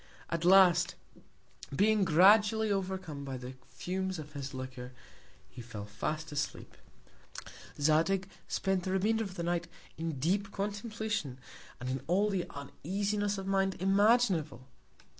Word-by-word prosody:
At 170 0 -1
last, 185 -1 +6 0.8
being 210 +4 +3
gradually 205 +5 +5
overcome 185 -7 -3
by 135 -2 -5
the 125 +1 -8
Fumes 185 +8 -3
of 150 -1 -9
his 140 -1 -5
Liquor, 130 -1 -7 0.5
he 125 - -10
fell 110 -3 -7
fast 155 +10 -4
asleep. 145 0 -4 1.0
Zadig 165 +6 +2 0.2
spent 190 -1 0
the 185 +1 -3
Remainder 220 +4 +1
of 195 -3 -7
the 170 - -4
Night 170 0 -1 0.3
in 165 0 -2
deep 195 +8 0
Contemplation, 205 - -3 0.4
and 125 - -5
in 130 +1 -2
all 200 +5 +2
the 185 -3 -1
Uneasiness 200 +8 -2
of 195 - -5
Mind 195 0 +1
imaginable. 195 - +2
185 Hz, 130 wpm, -31 LUFS, 145-200 Hz, 1.0 s, last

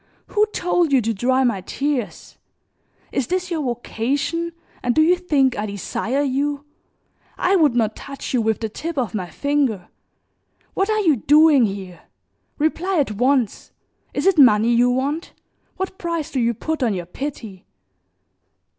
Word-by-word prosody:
Who 425 0 +2
told 355 -4 +1
you 270 - +5
to 225 -1 -1
dry 255 +5 +1
my 235 -7 0
tears? 275 +3 -4 0.7
Is 270 - -1
this 365 0 -2
your 325 -2 -1
vocation 275 +7 -2 0.3
and 245 - 0
do 315 - +5
you 350 +3 +4
think 290 -8 +1
I 210 +1 -3
desire 225 +7 -2
you? 285 +1 -1 0.7
I 375 +2 +2
would 300 -9 +3
not 220 -3 +1
touch 275 -1 -7
you 250 - +2
with 220 0 0
the 220 - -1
tip 315 +9 -6
of 240 -8 -1
my 185 -5 -4
finger. 275 -10 -1 0.8
What 390 +2 0
are 430 0 +2
you 320 -8 +3
doing 295 +1 +5
here? 190 -3 -7 0.6
Reply 340 +5 0
at 280 -7 +1
once. 245 +1 0 0.4
Is - - -3
it 385 -5 +4
money 230 -3 +6
you 240 +1 +4
want? 275 +6 -2 0.4
What 375 0 -4
price 335 -3 -3
do 265 - -1
you 235 -1 +1
put 315 +6 -3
on 230 -5 +1
your 175 -2 -4
pity?" 220 -2 -7
270 Hz, 160 wpm, -21 LUFS, 225-315 Hz, 0.8 s, money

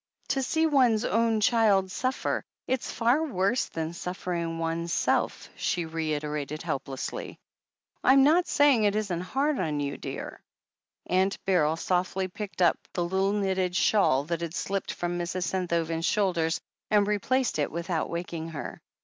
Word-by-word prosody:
"To 270 - +1
see 320 +5 +1
one's 250 -7 +3
own 225 0 +2
child 205 -4 +3
suffer 255 +6 -1
— - - -66
it's 260 -1 -1
far 245 +7 +2
worse 230 - +1
than 160 0 -4
suffering 170 -2 -3
oneself," 165 +1 0
she 175 -2 -1
reiterated 150 -2 -3
helplessly. 135 -4 -4 0.7
"I'm 270 +1 +6
not 335 +5 +4
saying 285 -6 +4
it 205 0 +2
isn't 195 -5 -1
hard 275 +9 0
on 155 -4 -1
you, 140 -1 -2
dear." - - -7 0.7
Aimt 190 +2 +2
Beryl 160 -5 +3
softly 185 +2 0
picked 190 0 -3
up 170 - +4
the 175 - 0
little 190 +2 +1
knitted 190 -3 0
shawl 190 -10 +3
that 170 +2 -3
had 170 0 -4
slipped 195 0 -2
from 175 0 -3
Mrs. 175 +1 -2
Senthoven's 170 -2 -1
shoulders 175 -6 +1 0.3
and 205 -1 +4
replaced 210 +1 0
it 145 - +1
without 170 0 -2
waking 170 -1 -4
her. 155 -3 -7
185 Hz, 150 wpm, -27 LUFS, 165-215 Hz, 0.7 s, I'm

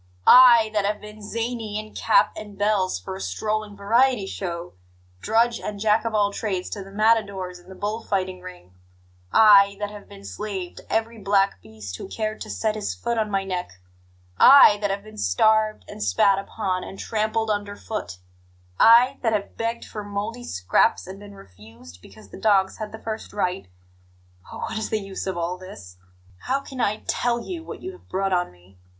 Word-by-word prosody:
I, 235 -3 +8
that 210 -1 +1
have 210 +1 -1
been 210 0 -12
zany 225 0 -4
in 215 0 -7
cap - - +3
and 210 -2 -9
bells 205 - +1
for 90 - -7
a 95 - -8
strolling 210 - -3
variety 230 +2 +2
show 175 -3 -5 0.5
drudge 230 +2 +2
and 205 -1 -6
Jack 215 +1 +2
of 225 -1 -2
all 205 -1 +2
trades 190 -5 -3
to 200 - -5
the 195 - -13
matadors 200 -4 0
in 175 +1 -19
the 190 - -10
bull 210 +4 -3
fighting 185 -3 -2
ring; 180 - -12 0.6
I, 200 -2 +6
that 205 0 -3
have 205 -1 -12
been 200 0 -13
slave 195 -4 -6
to - - -13
every 225 +1 -1
black 195 - +1
beast 100 -4 -9
who - - -8
cared 215 +1 -4
to 215 - -7
set 215 0 -1
his 215 -1 -4
foot 235 -1 -2
on 215 -1 -1
my 195 -1 0
neck; 180 - -4 0.7
I, 260 -6 +8
that 205 -1 -1
have 200 +1 -3
been 215 0 -12
starved 215 - +2
and - - -10
spat 105 - +3
upon 190 -2 -3
and 195 - -9
trampled 220 +1 -1
under 205 -1 -3
foot; 205 - -6 0.6
I, 245 +4 +6
that 225 -3 +1
have 205 -2 -3
begged 230 +1 -3
for 210 - -7
mouldy 210 +4 -5
scraps 90 0 +1
and 190 +1 -9
been 200 0 -12
refused 100 - -15
because 215 - -16
the - - -11
dogs 195 -3 +2
had 215 -1 -6
the 220 - -8
first 220 0 -6
right? 180 - -2 0.8
Oh, - - -8
what - - -3
is 220 - -4
the 220 - 0
use 195 -2 -6
of 190 -2 -3
all 175 +2 -3
this! 100 - -12 0.5
How 270 +2 +1
can 265 -2 -7
I 215 -1 -1
TELL 240 -1 0
you 335 +4 -6
what - - -9
you 375 - -5
have 370 - -18
brought 195 0 -1
on 180 0 0
me? 90 +1 -23
205 Hz, 195 wpm, -23 LUFS, 190-220 Hz, 0.8 s, I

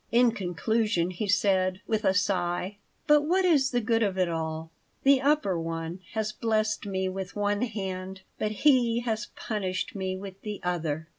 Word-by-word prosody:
In 240 0 +5
conclusion 200 -1 0
he 195 +4 -3
said, 190 -2 +2
with 220 0 -1
a 190 0 +3
sigh: 185 0 0 0.3
"But 295 0 +6
what 365 +5 +2
is 285 -7 +4
the 245 -2 0
good 225 +1 +1
of 200 -3 +1
it 185 -1 +2
all? 160 0 -3 0.3
The 275 -1 +5
Upper 275 - +2
One 165 +1 -4
has 220 -1 -1
blessed 220 -1 0
me 190 -1 -1
with 185 0 -5
one 205 0 0
hand, 190 -5 -4 0.2
but 215 - 0
He 240 -5 +5
has 225 -1 -2
punished 190 -4 -3
me 190 -1 -3
with 195 0 -9
the 210 -2 -5
other." 165 -3 -2
200 Hz, 170 wpm, -28 LUFS, 185-225 Hz, 0.3 s, But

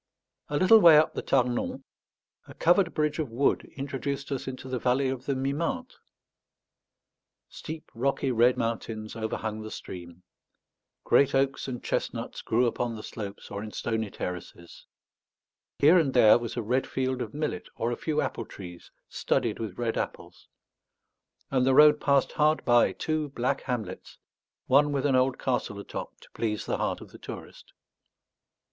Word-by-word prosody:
A 145 - 0
little 200 +7 +7
way 170 -6 +8
up 155 - +3
the - - -3
Tarnon, 125 -2 0 0.6
a - - -12
covered 175 +1 +3
bridge 150 0 -1
of 150 -5 -2
wood 125 +5 0
introduced 140 0 -4
us 135 -1 -3
into 130 0 -6
the 130 -1 -2
valley 130 +2 +1
of 130 -1 -5
the 140 - +1
Mimente. 160 - -2 1.6
Steep 160 0 -8
rocky 135 +2 0
red 120 +1 +4
mountains 115 -1 -3
overhung 110 -1 -3
the 110 - -7
stream; 90 -3 -9 0.8
great 140 - +4
oaks 135 0 +1
and 125 -2 -5
chestnuts - - -3
grew 120 +3 +2
upon 120 0 -1
the 110 - -8
slopes 100 -3 -8
or 100 - -4
in 110 - -6
stony 110 0 -2
terraces; 90 -2 -8 0.9
here 160 +5 +6
and 140 -5 0
there 115 -1 +7
was 120 0 -6
a 120 - -1
red 125 +5 0
field 130 -1 -2
of - - -5
millet 150 0 -3
or 115 +1 -1
a - - -1
few 150 +2 -1
apple 115 - -3
trees 90 -3 -10 0.2
studded - - -1
with 110 -5 -5
red 115 -2 -1
apples; - - -6 1.0
and 130 -2 +2
the 130 0 +3
road 150 0 +7
passed 140 -2 +2
hard 155 +1 +2
by 120 -1 +5
two 155 -2 -2
black 135 +1 -1
hamlets, 110 -8 -5 0.5
one 145 +3 +4
with 140 -1 -1
an 140 -2 +3
old 130 0 +2
castle 125 -5 -2
atop 100 - -7
to - - -18
please 105 -2 -2
the - - -1
heart - - -2
of - - -12
the - - -13
tourist. - - -10
130 Hz, 165 wpm, -27 LUFS, 115-140 Hz, 1.6 s, way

